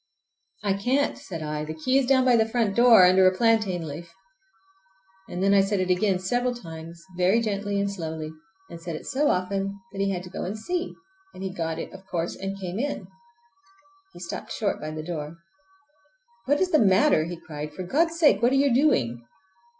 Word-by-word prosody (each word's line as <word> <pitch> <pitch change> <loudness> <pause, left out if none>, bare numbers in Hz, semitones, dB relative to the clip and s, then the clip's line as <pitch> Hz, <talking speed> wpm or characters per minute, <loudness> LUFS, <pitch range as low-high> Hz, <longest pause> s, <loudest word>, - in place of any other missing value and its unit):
"I 200 -2 +2
can't," 250 +9 0
said 175 - -7
I. 150 0 -3
"The 155 +1 -6
key 255 +12 +2
is 265 - -1
down 260 -1 +4
by 250 -2 +5
the 225 -1 +2
front 220 -4 0
door 235 -6 +7
under 185 +1 +6
a 185 0 +1
plantain 215 -7 +2
leaf!" 165 +4 -8 1.2
And 180 - -3
then 200 0 +4
I 200 - +6
said 195 0 0
it 185 0 0
again, 190 +1 +2
several 245 +7 -1
times, 165 -4 -10
very 185 +5 +3
gently 205 -2 -2
and 200 - 0
slowly, 160 -5 -5 0.4
and 170 -2 -10
said 170 -1 -5
it - - -8
so 290 +3 0
often 195 +2 -1
that 195 0 -4
he 195 - +1
had 180 -2 -3
to 180 - -11
go - - -5
and 200 +4 -4
see, 355 +10 -3 0.4
and 190 - -8
he 190 -1 -4
got 165 -3 -3
it, - - -6
of 190 0 -13
course, 170 -2 -3
and 195 +1 -5
came 185 +1 -4
in. 285 +3 -3 1.1
He - - -12
stopped - - -7
short 210 -3 -2
by 155 - -4
the 155 0 -6
door. 160 -2 -5 1.1
"What 290 +2 +3
is 370 -1 +1
the 310 - +5
matter?" 195 - +4
he 175 +1 -6
cried. 150 -2 -7
"For 185 +5 -7
God's 330 - +1
sake, 290 - +4
what 240 +2 +4
are - - +2
you 275 -2 +3
doing!" 125 - +2
195 Hz, 205 wpm, -25 LUFS, 170-235 Hz, 1.2 s, door